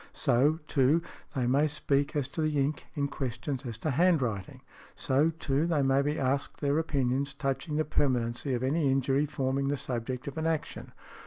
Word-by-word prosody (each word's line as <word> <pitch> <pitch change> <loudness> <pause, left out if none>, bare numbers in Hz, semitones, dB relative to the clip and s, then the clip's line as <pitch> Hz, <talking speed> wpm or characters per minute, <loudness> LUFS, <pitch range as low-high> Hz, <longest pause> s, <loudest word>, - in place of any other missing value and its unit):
So, 140 +3 +3
too, 145 +4 +3 0.3
they 130 -2 +1
may 140 +5 +3
speak 145 0 0
as 145 -3 0
to 160 - -3
the 155 -2 +1
ink 140 +2 -1
in 140 -2 0
questions 130 -1 -4
as 115 -2 -5
to 155 +6 -2
handwriting. 130 - +1 0.3
So, 140 +5 +2
too, 155 -1 -1
they 155 -5 +2
may 135 +1 +3
be 145 +2 -1
asked 135 +1 -1
their 145 +1 +1
opinions 140 -3 0
touching 135 +2 -2
the 155 0 +1
permanency 125 -2 0
of 120 - -3
any 140 +2 +2
injury 135 +2 +2
forming 135 -1 -1
the 145 +1 0
subject 125 +1 -4
of 140 +2 -4
an 160 - 0
action. 160 -2 -3
140 Hz, 180 wpm, -29 LUFS, 130-150 Hz, 0.3 s, So